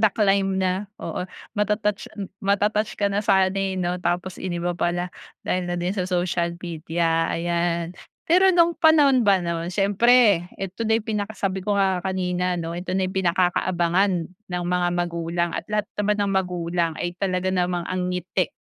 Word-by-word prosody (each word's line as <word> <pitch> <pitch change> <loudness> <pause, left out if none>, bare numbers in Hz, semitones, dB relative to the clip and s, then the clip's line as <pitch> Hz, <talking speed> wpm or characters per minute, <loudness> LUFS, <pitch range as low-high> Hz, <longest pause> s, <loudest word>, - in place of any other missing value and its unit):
The 215 -1 +5
Climb 195 -2 +2
na, 190 +2 -1
oo. 180 - -4 0.3
Mata-touch 210 0 0 0.3
mata-touch 210 +2 +1
ka 205 - +1
na 205 - +1
sana, 190 -2 +3
eh, 195 -1 -1
'no, 180 0 -1
tapos 180 +1 -2
iniba 175 -1 -2
pala 175 +1 -2 0.3
dahil 180 -1 -1
na 175 - -2
din 175 +2 -1
sa 185 -3 -2
social 175 -1 -1
media, 165 -1 -1
ayan. 170 0 -1 0.3
Pero 370 +3 +5
no'ng 340 -2 +4
panahon 295 -5 +5
ba 195 -2 +5
no'n, 170 0 -2
siyempre 200 -1 +4
'eto 195 +4 -4
na 220 - +4
yung 220 - -4
pinaka 215 0 -3
sabi 190 -1 -1
ko 205 +2 -1
nga 190 -2 +2
kanina 180 -1 -1
'no, 165 -1 -4
ito 180 +2 -3
na 190 - +1
ang 185 - -3
pinakakaabangan 180 +1 +2 0.4
ng 180 0 -3
mga 180 0 +1
magulang 170 0 -1
at - - -4
lahat 210 0 0 0.2
naman 210 0 +1
ng 195 - -1
magulang 175 -3 0
ay 175 - -3
talaga 185 -1 0
namang 180 -1 0
ang 180 -1 -1
ngiti, 180 +1 -1
185 Hz, 170 wpm, -23 LUFS, 175-200 Hz, 0.4 s, The